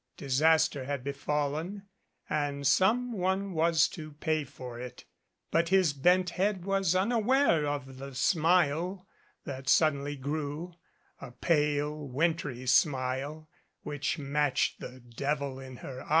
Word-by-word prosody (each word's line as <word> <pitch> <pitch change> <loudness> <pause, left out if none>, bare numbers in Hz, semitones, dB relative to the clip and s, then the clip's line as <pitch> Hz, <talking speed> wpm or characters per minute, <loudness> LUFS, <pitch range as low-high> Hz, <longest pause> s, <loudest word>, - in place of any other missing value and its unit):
Disaster 150 +1 +2
had 140 -2 -3
befallen 150 +7 -2 0.4
and 145 -1 -2
some 235 - +3
one 190 0 -1
was 165 0 +3
to 155 -4 -9
pay 155 +1 -1
for 125 -3 -9
it; 125 -1 -9 0.5
but 165 +1 +2
his 185 -5 +4
bent 180 +5 +3
head 190 0 -1
was 195 -3 +1
unaware 220 - +2
of 135 -2 -4
the 135 0 -8
smile 175 +4 +2 0.4
that 130 -2 -5
suddenly 145 -2 +3
grew, 150 +4 -4 0.5
a - - -8
pale 150 +2 0
wintry 140 -2 -1
smile 135 +3 +1 0.4
which 145 +2 -2
matched 145 -1 0
the 130 0 -9
devil 135 +3 -3
in 130 -1 -9
her 130 0 -8
eyes. - - -13
150 Hz, 125 wpm, -30 LUFS, 140-175 Hz, 0.5 s, his